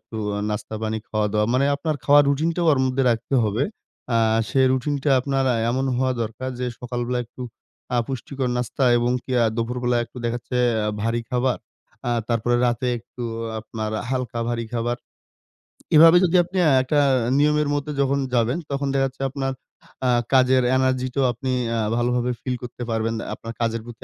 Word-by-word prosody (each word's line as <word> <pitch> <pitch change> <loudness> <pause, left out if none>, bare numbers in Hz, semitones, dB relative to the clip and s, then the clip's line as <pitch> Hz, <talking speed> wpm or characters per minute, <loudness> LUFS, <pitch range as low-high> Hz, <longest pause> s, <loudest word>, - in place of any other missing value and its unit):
একটু 110 - -10 0.2
আ - - -2
নাস্তা-পানি 110 +1 -3
খাওয়া-দাওয়া। 105 0 0
মানে 130 - +3
আপনার 155 +2 -2
খাওয়ার 145 +1 +6
রুটিনটাও 165 +4 +1
ওর 140 - +3
মধ্যে 130 +1 0
রাখতে 115 +4 -1
হবে। 110 +6 0 0.5
আ - - +4 0.3
সে 135 - +1
রুটিনটা 140 +2 0
আপনার 135 0 0
আ - - 0
এমন 130 +2 0
হওয়া 130 0 +1
দরকার 115 +4 -5
যে 125 - -2
সকালবেলা 125 0 -2
একটু 125 +2 -10 0.5
আ - - +2
পুষ্টিকর 135 0 -3
নাস্তা, 125 +2 -1
এবং 120 +1 +1
কি 130 - -5
আ - - +4
দুপুরবেলা 120 +1 -1
একটু 115 - -21
দেখা 120 0 0
যাচ্ছে 125 +1 -5 0.5
ভারী 115 +1 0
খাবার। 125 0 +1 0.5
আ - - +1 0.2
তারপরে 120 +1 +1
রাতে 120 +1 -1
একটু 120 +2 -11 0.4
আপনার 110 -1 -5 0.2
হালকা 125 -3 -2
ভারী 115 -1 -2
খাবার। 120 +1 -1 1.0
এভাবে 165 +3 +9
যদি 180 0 +2
আ - - +7
আপনি 185 +2 -6 0.2
একটা 145 +3 +1 0.4
নিয়মের 150 0 +2
মধ্যে 145 +1 -2
যখন 140 0 +1
যাবেন, 120 +4 +2
তখন 140 0 -1
দেখা 135 0 +2
যাচ্ছে 135 +1 -12
আপনার 135 0 -2 0.6
আ - - +3 0.2
কাজের 130 0 +5
এনার্জিটাও 130 0 +1
আপনি 130 +2 -3 0.3
আ - - 0 0.2
ভালোভাবে 125 +1 +1
ফিল 125 -1 -2
করতে 120 0 -7
পারবেন। 115 0 0 0.2
আপনার 115 0 -7
কাজের 115 -1 0
প্রতি 120 -1 -11
125 Hz, 170 wpm, -23 LUFS, 115-135 Hz, 1.0 s, এভাবে